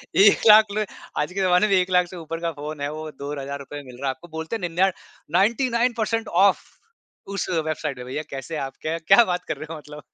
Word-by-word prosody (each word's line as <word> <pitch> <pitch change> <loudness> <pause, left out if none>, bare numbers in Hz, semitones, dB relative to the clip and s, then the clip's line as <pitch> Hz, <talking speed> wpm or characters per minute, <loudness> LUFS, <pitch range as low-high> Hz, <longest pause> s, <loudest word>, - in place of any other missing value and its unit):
1 200 +1 +6
लाख 215 0 +9
ले 215 0 0 0.3
आज 150 +4 -1
के 195 - -2
जमाने 185 +2 +4
में 200 - +1
1 185 0 +2
लाख 180 -1 +4
से 180 - -10
ऊपर 165 0 -6
का 165 - 0
फ़ोन 150 0 -6
है 145 - -2
वो 155 0 -6
₹2000 140 0 -6
में - - -18
मिल 120 - -13
रहा 140 - -1
है - - +2
आपको। 175 - -14
बोलते 160 +7 -4
हैं 220 - -5
निन्यान 185 +3 +2 0.5
99 235 +3 +2
परसेंट 225 0 -1
ऑफ, 190 +3 +4 0.7
उस 200 -1 -3
वेबसाइट 155 -3 -2
पे। 125 - -7
भईया 140 +4 -4
कैसे 140 +4 -5
आप 135 - -12
क्य 165 +1 -2
क्या 195 +5 +8
बात 180 0 -2
कर - - -3
रहे 155 +1 -7
हो 160 - -6
मतलब? 150 -1 -11
170 Hz, 235 wpm, -23 LUFS, 150-195 Hz, 0.7 s, लाख